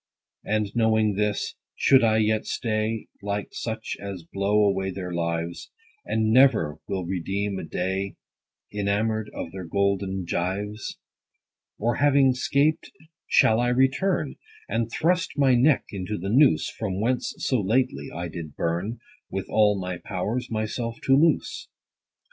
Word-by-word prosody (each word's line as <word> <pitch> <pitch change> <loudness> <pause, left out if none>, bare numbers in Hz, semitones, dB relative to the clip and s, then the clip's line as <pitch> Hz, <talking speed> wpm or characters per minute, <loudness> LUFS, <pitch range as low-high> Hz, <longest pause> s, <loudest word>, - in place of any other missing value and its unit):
20 110 - -1
And, 105 -2 -3
knowing 110 -2 +3
this, 105 +1 -1 0.2
should 135 -3 +5
I 110 -1 +4
yet 110 0 +1
stay, 110 -1 -1 0.2
Like 100 0 -3
such 110 -1 -4
as 100 -3 -6
blow 100 +4 +1
away 95 -1 +1
their 90 -1 -5
lives, 85 0 -3 0.4
And 110 0 +1
never 120 - +4
will 95 -2 -2
redeem 95 +2 -2
a - - -5
day, 95 +4 -2 0.6
Enamour'd 105 +1 0
of 80 - -6
their 95 -1 -6
golden 95 +1 0
gyves? 95 +4 -3 0.8
Or 115 +2 0
having 140 -2 +4
'scaped 140 +4 +1 0.4
shall 110 +1 +4
I 120 - +2
return, 135 +6 +1 0.3
And 115 0 -1
thrust 180 +5 0
my 135 -2 +4
neck 130 +4 +4
into 100 +1 -4
the 95 +3 -4
noose, 135 +6 +4
From 110 -6 -4
whence 125 +4 0
so 130 -5 0
lately, 100 - 0
I 85 0 -4
did 80 -3 -8
burn, 90 +8 -2 0.3
With 95 0 -3
all 105 -2 +3
my 90 -1 -4
powers, 105 +6 -3
myself 115 +1 -3
to 135 - +5
loose 155 +3 +2
105 Hz, 140 wpm, -25 LUFS, 95-120 Hz, 0.8 s, should